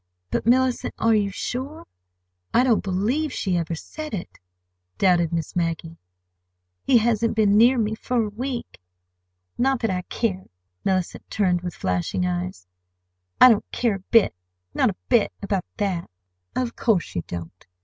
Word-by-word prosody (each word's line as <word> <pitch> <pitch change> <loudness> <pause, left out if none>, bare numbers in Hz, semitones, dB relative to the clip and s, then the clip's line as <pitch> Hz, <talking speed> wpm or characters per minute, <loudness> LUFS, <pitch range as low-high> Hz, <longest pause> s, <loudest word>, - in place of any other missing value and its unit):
"But, - - -1
Mellicent, 255 +1 +2
are 225 0 +3
you 205 -2 +2
sure? 260 +9 -5 0.7
I 245 - +6
don't 240 -4 +3
believe 225 +11 0
she 190 -7 -1
ever 170 -1 -1
said 305 - -6
it," 180 - -8 0.6
doubted 175 -3 +3
Miss 165 -2 -3
Maggie. 165 -1 -2 0.9
"He 245 - +5
hasn't 230 0 +1
been 210 -2 +4
near 240 +4 +6
me—for 225 +2 0
a - - -4
week. 245 +3 -5 0.8
Not 265 +1 +2
that 225 - +1
I 180 -1 -1
care!" 190 -1 -3 0.4
Mellicent 185 -2 -1
turned 180 -4 +1
with 175 -1 -5
flashing 90 0 -1
eyes. 90 0 -3 0.7
"I 255 - +10
don't 220 -3 +2
care 235 -3 +1
a 190 - -20
bit—not 90 - +1
a 195 - -4
bit—about 200 -5 +1
that!" 190 -5 -2 0.5
"Of 245 -2 -1
course 210 -7 +1
you 90 - -1
don't! 85 +1 -8
200 Hz, 145 wpm, -24 LUFS, 170-235 Hz, 0.9 s, I